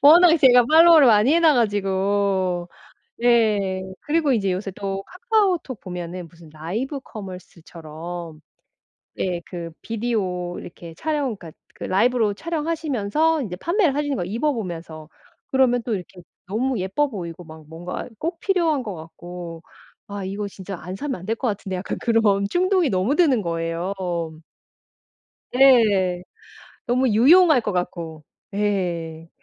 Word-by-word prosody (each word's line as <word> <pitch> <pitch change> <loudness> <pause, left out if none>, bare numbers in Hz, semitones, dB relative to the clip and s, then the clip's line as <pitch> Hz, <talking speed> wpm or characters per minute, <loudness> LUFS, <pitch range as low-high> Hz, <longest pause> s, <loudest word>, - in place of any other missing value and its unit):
워낙에 330 +3 +7
제가 250 -4 +7
follow를 325 -2 +8
많이 225 +6 +5
해 340 - +4
놔 320 -3 +5
가지고. 195 -4 0 0.5
예. 210 -6 +2 0.2
그리고 300 -2 +1
이제 200 -5 +1
요새 195 +2 -3
또 195 0 -4
카카오톡 370 - 0
보면은 180 -1 -6
무슨 165 -1 -17
라이브 210 - -4
커머스처럼. 170 -4 -9 0.8
네, 180 -2 -2
그 170 -2 -7
비디오 200 -6 -2
이렇게 170 -1 -10
촬영 290 - -2
그러니까 165 -4 -11 0.2
그 - - -7
라이브로 220 +2 +2
촬영하시면서 315 -1 -1
이제 185 -6 -5
판매를 340 - +1
하려는 290 -1 -1
거야, 175 - -2
입어 235 +10 0
보면서. 165 - -6 0.4
그러면 255 -2 +2
또 230 - -2
이렇게 180 -1 -9 0.3
너무 235 +3 -1
예뻐 195 +11 0
보이고 175 -6 -7
막 160 -1 -13
뭔가 175 +7 -6
꼭 330 +1 -3
필요한 335 -8 +1
것 210 -4 -5
같고. 170 +1 -9 0.4
'아 200 -1 -6
이거 200 +2 -4
진짜 190 -1 -8
안 180 +3 -6
사면 265 -2 -4
안 - - -10
될 225 - 0
것 255 - -2
같은데.' 195 -2 -4
약간 180 - -4
그런 220 -4 +2
충동이 365 - +2
너무 195 +7 +1
드는 290 -10 +3
거예요. 165 +2 -2 1.6
네. 210 -9 +4 0.6
너무 255 +2 +2
유용할 290 - +6
것 210 -3 -3
같고. 170 -3 -4 0.3
예. 170 -6 -2
205 Hz, 300 characters per minute, -22 LUFS, 180-270 Hz, 1.6 s, follow를